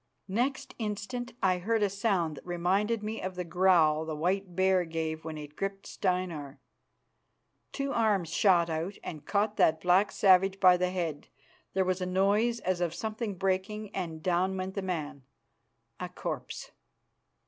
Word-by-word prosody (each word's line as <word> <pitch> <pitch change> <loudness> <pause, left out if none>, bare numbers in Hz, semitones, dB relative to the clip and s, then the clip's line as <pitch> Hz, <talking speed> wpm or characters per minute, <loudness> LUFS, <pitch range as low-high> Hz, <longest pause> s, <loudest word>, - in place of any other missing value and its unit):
Next 260 +5 -1
instant 225 +3 -4
I 185 -1 +3
heard 220 +4 +1
a - - +4
sound 190 -7 0
that - - -10
reminded 195 +6 0
me 220 +1 -4
of 185 0 -4
the 180 - -3
growl 170 -3 +3
the 160 -1 -4
white 180 +3 -1
bear 190 -1 +3
gave 160 -1 -3
when 160 -1 -5
it 150 0 -9
gripped 195 +2 -4
Steinar. 180 -7 -2 1.1
Two 275 0 -2
arms 205 -7 +2
shot 175 -4 +4
out 165 +4 -3
and 155 -3 -7
caught 205 +1 +1
that 160 0 +4
black 185 +3 +4
savage 195 0 +4
by 185 -2 +7
the 180 0 0
head. 170 -5 -3 0.5
There 190 -1 +3
was 185 0 0
a 180 - -1
noise 205 +6 +2
as 185 -2 -1
of 170 -2 -1
something 220 -1 -3
breaking, 195 +3 -2
and 165 -4 -4
down 185 +1 +1
went 185 +1 -3
the 195 - -2
man 160 -7 -4 0.8
a - - -4
corpse. - - -5
185 Hz, 160 wpm, -30 LUFS, 170-200 Hz, 1.1 s, by